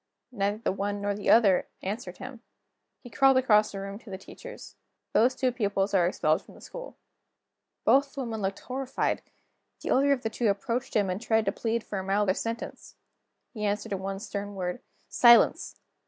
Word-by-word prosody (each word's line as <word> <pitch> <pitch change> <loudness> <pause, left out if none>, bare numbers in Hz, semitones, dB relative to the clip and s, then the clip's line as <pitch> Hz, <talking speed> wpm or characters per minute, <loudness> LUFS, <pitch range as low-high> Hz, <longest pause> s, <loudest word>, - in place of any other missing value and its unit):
Neither 205 -2 -1
the 230 - -1
one 205 +1 -2
nor 205 0 -1
the 205 0 -3
other 205 -5 +5 0.2
answered 190 -2 -5
him. 255 -2 -9 0.6
He 245 - -11
called 270 -1 +5
across 215 -5 +4
the 195 - -6
room 195 +1 -6
to 225 - -15
the 190 - -5
teachers: - - -11 0.4
"Those 250 +4 +4
two 255 -1 +1
pupils 200 -4 -1
are 180 -3 +4
expelled 155 -3 +1
the - - -15
school." - - -9 0.9
Both 275 0 +3
the 275 - -3
women 225 -4 -4
looked 195 0 -3
horrified. 260 +1 -2 0.6
The - - -4
elder 280 +2 +4
of 270 -3 +1
the 225 - -2
two 235 +1 0
approached 230 +5 -2
him, 205 -2 +3
and 185 +4 -4
tried 220 -2 +1
to - - +1
plead 230 0 -2
for 200 - -4
a - - -4
milder 195 0 +2
sentence. 230 +3 -6 0.6
He 215 -3 -5
answered 205 0 -1
in 195 - -1
one 195 +1 -4
stern 205 -1 -5
word: 180 +4 -3 0.3
"Silence!" 240 -3 +5
210 Hz, 185 wpm, -28 LUFS, 195-245 Hz, 0.9 s, other